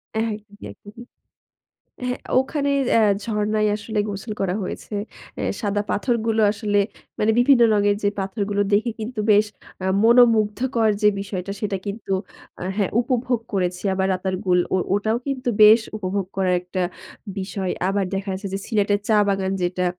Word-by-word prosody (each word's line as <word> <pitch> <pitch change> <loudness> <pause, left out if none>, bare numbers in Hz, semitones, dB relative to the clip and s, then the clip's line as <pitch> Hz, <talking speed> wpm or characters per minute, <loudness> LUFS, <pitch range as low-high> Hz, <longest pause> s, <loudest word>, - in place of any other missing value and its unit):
একদমই, 215 -2 -4
একদমই। 215 +4 -13 1.0
হ্যাঁ, 250 - -2 0.2
ওখানে 280 +1 -1 0.3
আ - - +5 0.2
ঝরনায় 215 -1 0
আসলে 215 0 -4
গোসল 205 +2 -5
করা 190 -2 0
হয়েছে। 190 - -6 0.5
এ - - -2 0.2
সাদা 205 -1 0
পাথরগুলো 225 -1 0
আসলে 205 -1 0 0.4
মানে 215 - +2
বিভিন্ন 245 0 +5
রঙের 205 0 +2
যে 205 - +3
পাথরগুলো 200 +1 -1
দেখে 220 +4 +3
কিন্তু, 220 +1 -4
বেশ 210 +1 +4 0.4
আ - - 0 0.2
মনোমুগ্ধকর 230 0 +4
যে 210 - +6
বিষয়টা, 195 -1 -4
সেটা 205 -2 -1
কিন্তু 200 0 -4 0.5
আ - - -6
হ্যাঁ, 200 -3 0
উপভোগ 245 -1 0
করেছি। 180 -2 -1
আবার 190 0 0
রাতার 185 0 -2
গুল, 180 -1 +4 0.2
ও - - +4 0.2
ওটাও 215 +3 +1
কিন্তু 260 -3 -2
বেশ 215 +2 +8 0.2
উপভোগ 195 -1 -2
করার 185 -2 +2
একটা 180 +1 -3 0.6
বিষয়। 190 0 -3 0.2
আবার 195 0 +1
দেখা 195 0 -3
গেছে 195 +2 -6
যে, 195 - -1
সিলেটের 205 -2 +1
চা 215 - +4
বাগান 195 -1 0
যেটা, 180 +1 0
205 Hz, 155 wpm, -22 LUFS, 195-225 Hz, 1.0 s, বেশ